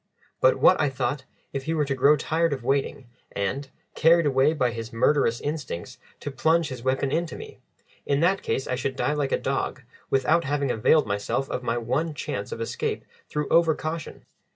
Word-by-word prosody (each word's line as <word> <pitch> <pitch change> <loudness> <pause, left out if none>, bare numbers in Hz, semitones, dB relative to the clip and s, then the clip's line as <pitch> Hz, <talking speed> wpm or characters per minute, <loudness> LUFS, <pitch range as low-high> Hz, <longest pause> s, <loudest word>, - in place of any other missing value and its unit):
But - - +4
what, 185 - +5
I 150 - +2
thought, 130 +1 -2 0.3
if 135 -1 -4
he 160 +1 -1
were 150 -2 +1
to 140 - -1
grow 140 +3 +4
tired 165 +2 0
of 130 -3 -5
waiting, 135 +1 -1 0.3
and, 135 +8 -2 0.2
carried 165 +1 +4
away 135 +1 +3
by 130 -6 +1
his 115 0 -6
murderous 120 0 +2
instincts, 145 - -5 0.2
to 145 - -4
plunge 160 +3 +2
his 130 -3 -7
weapon 135 +2 0
into 170 +2 -1
me? 440 -1 -10 0.5
In 140 0 +2
that 185 +3 +2
case 135 - -2
I - - -3
should 130 +1 -2
die 145 - 0
like 145 -2 -1
a - - +3
dog, 135 -1 -2 0.3
without 155 +5 +2
having 140 -2 0
availed 140 +7 +3
myself 100 +6 -2
of - - -2
my 120 -1 -1
one 140 +7 -1
chance 100 -6 -4
of - - -5
escape 115 - -3 0.2
through 150 -1 -2
over 165 -2 +4
caution. 160 +1 -6
140 Hz, 195 wpm, -25 LUFS, 130-155 Hz, 0.5 s, what